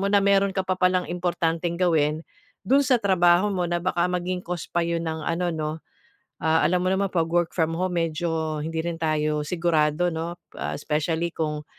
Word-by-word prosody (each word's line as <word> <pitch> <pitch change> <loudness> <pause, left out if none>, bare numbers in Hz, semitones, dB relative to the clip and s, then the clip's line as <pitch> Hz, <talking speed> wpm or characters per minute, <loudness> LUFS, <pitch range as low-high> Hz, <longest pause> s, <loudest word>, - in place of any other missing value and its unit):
mo 200 - 0
na 200 - +5
meron 200 0 +3
ka 190 - +1
pa 185 - 0
palang 185 -1 +2
importanteng 170 -1 -1
gawin 155 -3 +2 0.5
do'n 275 +5 +5
sa 255 - +3
trabaho 185 -1 +4
mo, 180 -3 -1
na 175 0 -1
baka 175 -1 +1
maging 180 0 -2
cause 175 -2 -5
pa 175 - +1
'yon 170 0 -1
ng 160 -1 -3
ano 175 +1 0
'no? 155 -2 -2 0.7
Ah, 160 +1 +3
alam 180 +1 +2
mo - - +2
naman 195 +1 +1
'pag 165 -3 +1
work 175 0 +1
from 165 -1 +1
home 180 0 -1
medyo 160 -1 -2
hindi 160 +1 -3
rin 170 -1 -2
tayo 155 -1 0
sigurado 165 -1 +1
'no? 165 +2 -4 0.2
Pa - - -4
especially 160 +3 -1
kung, 150 -1 -2
170 Hz, 195 wpm, -25 LUFS, 160-180 Hz, 0.7 s, na